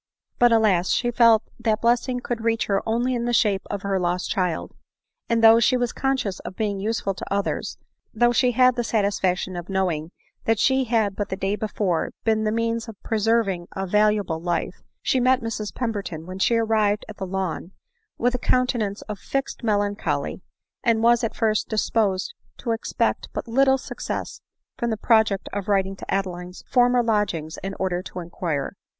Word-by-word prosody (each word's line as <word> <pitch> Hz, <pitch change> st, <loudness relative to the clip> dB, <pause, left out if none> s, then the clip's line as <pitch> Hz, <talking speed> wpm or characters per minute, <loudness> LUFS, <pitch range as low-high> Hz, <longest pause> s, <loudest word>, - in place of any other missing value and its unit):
But, 240 Hz, -1 st, +6 dB
alas! 205 Hz, -6 st, +3 dB
she 240 Hz, -1 st, +1 dB
felt 230 Hz, -2 st, +5 dB, 0.2 s
that 225 Hz, -2 st, +1 dB
blessing 245 Hz, +1 st, +2 dB
could 240 Hz, -2 st, -3 dB
reach 230 Hz, 0 st, +1 dB
her 195 Hz, -1 st, +1 dB
only 240 Hz, +3 st, +1 dB
in 240 Hz, -1 st, -1 dB
the 240 Hz, -, 0 dB
shape 205 Hz, -4 st, +3 dB
of 200 Hz, -1 st, -4 dB
her 195 Hz, -1 st, 0 dB
lost 180 Hz, 0 st, -1 dB
child; 180 Hz, -4 st, -1 dB, 0.6 s
and, 230 Hz, -1 st, +2 dB
though 225 Hz, +1 st, +8 dB
she 250 Hz, +2 st, +3 dB
was 245 Hz, -1 st, -1 dB
con 270 Hz, 0 st, 0 dB
scious 200 Hz, -7 st, -3 dB
of 185 Hz, -, -8 dB
being 205 Hz, -2 st, -1 dB
useful 205 Hz, -1 st, -1 dB
to 185 Hz, -, -8 dB
others, 200 Hz, 0 st, -2 dB, 0.3 s
though 240 Hz, +2 st, +3 dB
she 245 Hz, +1 st, +2 dB
had 255 Hz, +1 st, +5 dB
the 240 Hz, -, -1 dB
sat 220 Hz, -3 st, +1 dB
isfaction 185 Hz, -2 st, -1 dB
of 175 Hz, +1 st, -6 dB
knowing 175 Hz, -5 st, -1 dB, 0.4 s
that 225 Hz, 0 st, +2 dB
she 265 Hz, +3 st, +2 dB
had 220 Hz, -4 st, +1 dB
but 205 Hz, -, -3 dB
the -, -, -2 dB
day 195 Hz, +1 st, -1 dB
before 205 Hz, -5 st, -1 dB
been 220 Hz, -1 st, +1 dB
the 215 Hz, -, +1 dB
means 230 Hz, +1 st, -1 dB
of 220 Hz, -3 st, -10 dB
preserving 215 Hz, -5 st, +1 dB
a 195 Hz, -, -2 dB
valuable 210 Hz, -4 st, +1 dB
life, 175 Hz, 0 st, -2 dB, 0.2 s
she 260 Hz, -, +2 dB
met 255 Hz, +1 st, +3 dB
Mrs 220 Hz, -2 st, -4 dB
Pem 240 Hz, -3 st, -2 dB
berton, 180 Hz, -7 st, -5 dB
when 185 Hz, +1 st, -7 dB
she 235 Hz, -, +3 dB
arrived 215 Hz, -2 st, +1 dB
at 215 Hz, -, -10 dB
the 190 Hz, -, -4 dB
Lawn, 185 Hz, -2 st, -3 dB, 0.5 s
with 245 Hz, +1 st, +1 dB
a 250 Hz, -, -1 dB
counte 255 Hz, +1 st, +2 dB
nance 200 Hz, -1 st, -3 dB
of 210 Hz, -2 st, -7 dB
fixed 275 Hz, -2 st, -3 dB
melancholy, 205 Hz, -2 st, -1 dB, 0.4 s
and 230 Hz, -1 st, +2 dB
was 235 Hz, 0 st, +4 dB
at 230 Hz, -, -2 dB
first 215 Hz, -1 st, 0 dB
disposed 215 Hz, -, 0 dB, 0.2 s
to 235 Hz, -, -3 dB
expect 225 Hz, -, -1 dB
but -, -, -4 dB
little 265 Hz, +3 st, +4 dB
success -, -, -5 dB, 0.4 s
from 235 Hz, -2 st, 0 dB
the 220 Hz, -, -1 dB
project 220 Hz, -3 st, +2 dB
of 200 Hz, -1 st, -3 dB
writing 195 Hz, -1 st, +1 dB
to -, -, -8 dB
Adeline's 180 Hz, -2 st, -3 dB
former 245 Hz, -1 st, +4 dB
lodgings 195 Hz, -8 st, -1 dB
in 195 Hz, 0 st, -5 dB
order 180 Hz, -2 st, -1 dB
to 185 Hz, -, -8 dB
inquire. 165 Hz, -4 st, -3 dB
215 Hz, 190 wpm, -24 LUFS, 190-235 Hz, 0.6 s, though